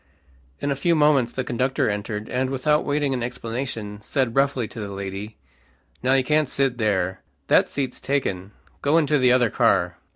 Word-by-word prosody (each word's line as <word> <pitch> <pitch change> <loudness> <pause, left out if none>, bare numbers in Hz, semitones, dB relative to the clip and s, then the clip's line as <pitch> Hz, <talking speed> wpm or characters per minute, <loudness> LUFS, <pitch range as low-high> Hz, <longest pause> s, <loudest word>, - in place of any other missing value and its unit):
In 145 - -1
a - - +1
few 170 +5 +2
moments 150 -5 +3
the 130 - -3
conductor 125 +2 0
entered, 105 +1 -3
and 130 +1 -1
without 150 +3 +1
waiting 145 -1 0
an 125 - -2
explanation, 115 -3 -4
said 125 +1 -1
roughly 135 -4 +1
to 115 - -10
the 105 - -4
lady, 100 +2 -6 0.6
"Now 130 +1 +2
you 135 - +3
can't 150 +1 +2
sit 135 -3 0
there. 95 -4 0 0.3
That - - +4
seat's 135 -3 -3
taken. 100 -9 -2 0.3
Go 145 +3 +3
into 150 -2 +3
the 125 -1 +4
other 125 -3 +3
car." - - +2
125 Hz, 175 wpm, -23 LUFS, 110-140 Hz, 0.6 s, That